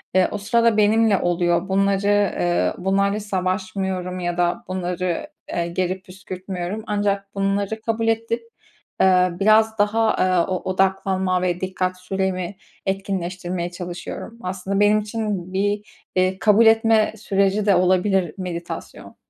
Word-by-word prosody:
eee, 185 - +5
o 210 - -2
sırada 230 +2 +2
benimle 215 -1 +4
oluyor. 175 +1 +1
Bunları, 195 +1 +2
eee, 200 -4 +2
bunlarla 195 +2 +1
savaşmıyorum 185 -1 -2
ya 175 -1 -2
da 175 +6 0
bunları, 180 - -2 0.3
eee, 170 0 -1
geri 185 +2 -2
püskürtmüyorum. 185 +2 -6
Ancak 200 -1 -1
bunları 200 +2 -1
kabul 225 0 -1
edip, 230 +1 0 0.6
eee, 185 -1 +5
biraz 220 +2 +4
daha, 220 +2 +2
eee, 185 -2 +3
o - - +1 0.2
odaklanma 190 -1 +1
ve 180 -1 -1
dikkat 185 -1 -2
süremi 190 0 -2 0.3
etkinleştirmeye 185 -2 -3
çalışıyorum. 180 +6 -7
Aslında 190 +2 -2
benim 210 +1 +5
için 210 -4 -4
bir, 205 +2 0 0.3
eee, 185 +1 +1
kabul 220 +1 +5
etme 225 -1 +4
süreci 200 0 +1
de 200 - +5
olabilir 185 -1 +2
meditasyon. 175 -2 -7
190 Hz, 125 wpm, -22 LUFS, 185-205 Hz, 0.6 s, eee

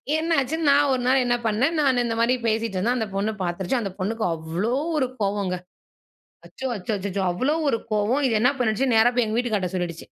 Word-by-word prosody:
என்னாச்சு. 315 -3 +1
நான் 285 0 +5
ஒரு 255 - 0
நாள் 265 +1 +4
என்ன 245 0 +2
பண்ணேன்? 240 +9 +1
நான் 260 -4 +3
இந்த 230 -1 -2
மாரி 235 +2 +3
பேசிட்டு 220 -2 -1
இருந்தேன். 235 +7 +1
அந்த 220 -2 -1
பொண்ணு 200 +2 0
பார்த்துருச்சு. 180 +7 -1
அந்த 200 -3 -4
பொண்ணுக்கு 220 +4 -2
அவ்வளோ 165 +8 -2 0.2
ஒரு 265 -3 +1
கோவங்க. 200 -2 0 0.9
அச்சோ! 265 - -7
அச்சோ! 200 +2 -4
அச்சச்சோ! 200 0 -3
அவ்வளோ 260 - 0
ஒரு 230 -4 +1
கோவம். 215 +7 +1
இது 225 -3 +2
என்னா 250 +4 +4
பண்ணிடுச்சு? 245 +2 +1
நேரா 225 +2 +5
போய் 245 -2 +3
எங்க 215 +1 -2
வீட்டுக்காரர்ட்ட 210 -7 -1
சொல்லிடுச்சு. 175 -2 -4
225 Hz, 195 wpm, -24 LUFS, 200-255 Hz, 0.9 s, நான்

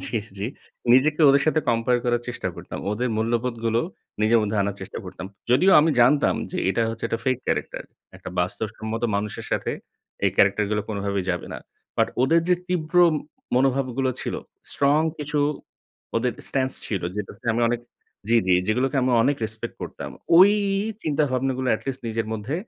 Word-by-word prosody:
জি, 115 - -2 0.2
জি। 100 - -2 0.5
নিজেকে 150 +5 +4
ওদের 140 +1 +5
সাথে 155 0 +3
কম্পেয়ার 120 +1 +2
করার 120 -1 +1
চেষ্টা 125 - -3
করতাম। - - -8
ওদের 120 +4 -1
মূল্যবোধগুলো, 115 0 0 0.4
নিজের 115 +2 +5
মধ্যে 105 0 -1
আনার 100 0 -2
চেষ্টা 95 - -7
করতাম। 90 0 -7 0.2
যদিও 160 +10 +5
আমি 160 - +3
জানতাম 140 +5 +4 0.2
যে, - - -4
এটা 105 +4 +1
হচ্ছে 115 0 -6
একটা 115 - -1
ফেক 130 -1 +2
ক্যারাক্টার। - - -2 0.3
একটা - - -9
বাস্তবসম্মত 110 +5 -2
মানুষের 105 +1 -4
সাথে - - -1 0.5
এই - - +4
ক্যারাক্টার 105 - +4
গুলো 105 -1 0
কোনভাবেই 100 -2 -2
যাবে 90 -1 -3
না। - - -5 0.4
বাট - - +3
ওদের 165 +6 +4
যে, 180 - +5
তীব্র 175 -1 -2 0.6
মনোভাবগুলো 130 0 +1
ছিল, - - -3 0.4
স্ট্রং 140 +2 +3 0.2
কিছু 150 0 -2 0.8
ওদের 120 +2 +1 0.2
স্ট্যান্স 130 -1 0
ছিল, 100 -5 -2
যেটা 105 -2 -4
তে - - -11
আমি 120 - +1
অনেক 120 0 -1 0.5
জ্বি, 115 0 +5
জ্বি, 90 - +5
যেগুলোকে 125 +6 +1
আমি 130 - +2
অনেক 140 +4 +2
রেসপেক্ট 110 +1 -5
করতাম। - - -6 0.3
ওই 190 +3 +9 0.5
চিন্তাভাবনাগুলো 135 -3 0
এটি - - -7
লিস্ট 130 0 -4
নিজের 115 -1 -2
মধ্যে 110 +7 -3
120 Hz, 165 wpm, -24 LUFS, 110-135 Hz, 0.8 s, ওই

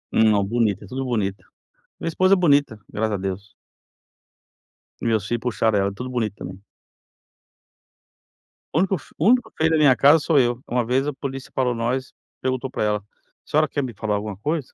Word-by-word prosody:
Não, 110 -3 +4
bonita, 105 -2 0
é - - -14
tudo 135 +4 -4
bonita, 105 -6 -2 0.6
minha - - -4
esposa 185 +4 +4
é - - -1
bonita, 145 -10 +3
graças 110 +1 -1
a - - -2
Deus. 95 +1 -5 1.5
Meus 110 -4 +1
filhos 120 -1 -1
puxaram 110 -3 +1
ela, 100 0 +1
é - - -9
tudo 125 +5 -6
bonito 110 -5 -2
também. 95 +2 -9 2.1
O 160 - +2
único 190 0 +2
fe - - -15
o 165 - +2
único 240 -2 +3
feio 160 +1 +2
da 160 - +3
minha 140 -4 +6
casa 145 +7 +6
sou 155 -1 +2
eu, 120 -1 +1
uma 125 +1 0
vez 130 +4 +1
a 150 - -1
polícia 135 -1 -6
parou 125 -2 +1
nós, 125 +3 -2 0.3
perguntou 130 0 -2
pra - - -2
ela: 105 0 +1
"A - - -24 0.4
senhora 155 +1 +2
quer 145 - -2
me 125 -3 -5
falar 105 0 -2
alguma 105 -1 -4
coisa?". 150 +5 -3
125 Hz, 190 wpm, -23 LUFS, 105-145 Hz, 2.1 s, minha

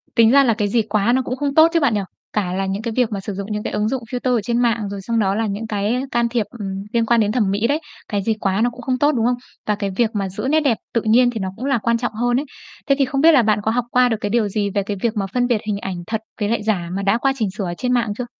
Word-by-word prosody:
Tính 230 -2 +6
ra 280 +1 +6
là 235 -4 +3
cái 210 -1 -1
gì 230 +3 +2
quá 215 +1 +1
nó 260 - +3
cũng 255 0 -3
không 280 +1 -2
tốt 315 +1 +8
chứ 335 - +4
bạn 280 -7 +2
nhỉ. 205 - +1 0.3
Cả 190 -4 -1
là 195 +1 -1
những 195 +2 -2
cái 230 0 -3
việc 245 -3 +2
mà 205 - -2
sử 195 +1 -5
dụng 200 +2 -6
những 210 0 -2
cái - - -4
ứng 210 0 0
dụng 260 -1 -2
filter 250 0 0
ở 230 - +1
trên 235 +3 -1
mạng, 230 -4 +1
rồi 200 0 -6
xong 230 +4 -1
đó 195 -2 +1
là 225 +1 0
những 205 +2 -4
cái 215 +4 -1
can 235 0 +1
thiệp, 230 -2 0
ừm, 195 -1 -4
liên 230 -1 +2
quan 235 +1 +3
đến 210 -1 +2
thẩm 215 -5 +1
mỹ 210 +3 +1
đấy. 290 +4 +1 0.3
Cái 205 -3 -1
gì 225 - +1
quá 195 +1 0
nó 240 - +3
cũng 245 +1 -11
không 255 +1 -1
tốt, 290 +2 +4
đúng 235 -6 0
không? 245 +1 +2 0.3
Và 210 - +2
cái 200 -1 -3
việc 235 0 +2
mà 200 -2 -2
giữ 195 +7 -4
nét 310 +2 +4
đẹp 275 -7 +1 0.2
tự 230 - +2
nhiên 235 +3 +4
thì 225 - -5
nó 190 -1 -2
cũng 245 - -6
là 275 -2 +2
quan 235 +1 +1
trọng 240 -1 -3
hơn 240 +2 +1
đấy. 280 - -1 0.4
Thế 275 - +4
thì 275 - +4
không 275 +1 -1
biết 330 +2 +7
là 280 -5 +6
bạn 215 -2 +2
có 220 - +1
học 240 +1 0
qua 250 0 +4
được 225 - 0
cái 205 - -1
điều 225 0 +2
gì 205 0 -1
về 200 - +1
cái 200 +1 -4
việc 230 -2 -1
mà 200 - 0
phân 245 -1 +1
biệt 235 -4 +1
hình 210 -2 0
ảnh 190 -2 -4
thật 220 -1 -2 0.2
với 205 -1 0
lại 225 -2 0
giả 190 -6 -1
mà 195 - -2
đã 200 +3 +2
qua 270 +3 +1
chỉnh 220 -5 0
sửa 200 - -2
ở 175 - -3
trên 250 +4 0
mạng 235 -4 +1
chưa? 250 - -3
225 Hz, 340 wpm, -20 LUFS, 205-245 Hz, 0.4 s, tốt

